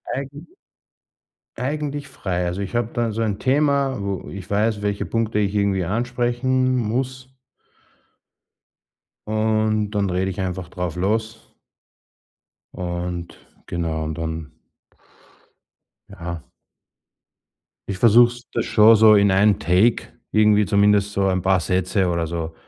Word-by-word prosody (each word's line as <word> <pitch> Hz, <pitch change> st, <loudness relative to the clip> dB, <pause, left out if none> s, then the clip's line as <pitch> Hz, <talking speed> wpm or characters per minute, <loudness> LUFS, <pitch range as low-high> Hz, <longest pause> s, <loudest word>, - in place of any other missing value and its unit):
Eigent 140 Hz, +4 st, -7 dB, 1.1 s
Eigentlich 145 Hz, +2 st, -3 dB
frei, 90 Hz, -9 st, -3 dB
also 90 Hz, +3 st, -3 dB
ich 100 Hz, +4 st, -5 dB
habe 120 Hz, -1 st, -2 dB
da 120 Hz, -1 st, -1 dB
so 110 Hz, +2 st, -3 dB
ein 105 Hz, -3 st, -1 dB
Thema, 140 Hz, +1 st, +1 dB
wo 100 Hz, -1 st, -4 dB
ich 95 Hz, -2 st, -9 dB
weiß, 105 Hz, +1 st, 0 dB
welche 100 Hz, 0 st, -2 dB
Punkte 115 Hz, -2 st, -1 dB
ich 100 Hz, -1 st, 0 dB
irgendwie 100 Hz, -2 st, +1 dB
ansprechen 120 Hz, +5 st, 0 dB
m 130 Hz, 0 st, +1 dB
muss 130 Hz, +3 st, -3 dB, 1.9 s
und 110 Hz, -1 st, 0 dB
dann 100 Hz, -2 st, 0 dB
rede 95 Hz, +1 st, -1 dB
ich 95 Hz, -, -8 dB
einfach 90 Hz, -1 st, -4 dB
drauf 90 Hz, -3 st, -4 dB
los 110 Hz, +4 st, -3 dB, 1.2 s
und 85 Hz, -1 st, -5 dB, 0.3 s
genau 80 Hz, -2 st, -3 dB
und 80 Hz, +1 st, -5 dB
dann 80 Hz, -1 st, -5 dB, 1.6 s
Ja. 85 Hz, -2 st, -7 dB, 1.4 s
Ich 100 Hz, -, -4 dB
versuch's 120 Hz, +3 st, +5 dB
das 115 Hz, -, -1 dB
schon 110 Hz, +1 st, +6 dB
so 110 Hz, 0 st, +7 dB
in 100 Hz, -1 st, +4 dB
einem 100 Hz, +1 st, +3 dB
Take 90 Hz, +9 st, +2 dB, 0.2 s
irgendwie, 105 Hz, -1 st, +4 dB
zumindest 100 Hz, 0 st, +2 dB
so 100 Hz, 0 st, +1 dB
ein 95 Hz, -1 st, 0 dB
paar 95 Hz, 0 st, +2 dB
Sätze 95 Hz, +2 st, 0 dB
oder 85 Hz, -1 st, -1 dB
so 80 Hz, -1 st, -4 dB
105 Hz, 125 wpm, -21 LUFS, 90-115 Hz, 1.9 s, so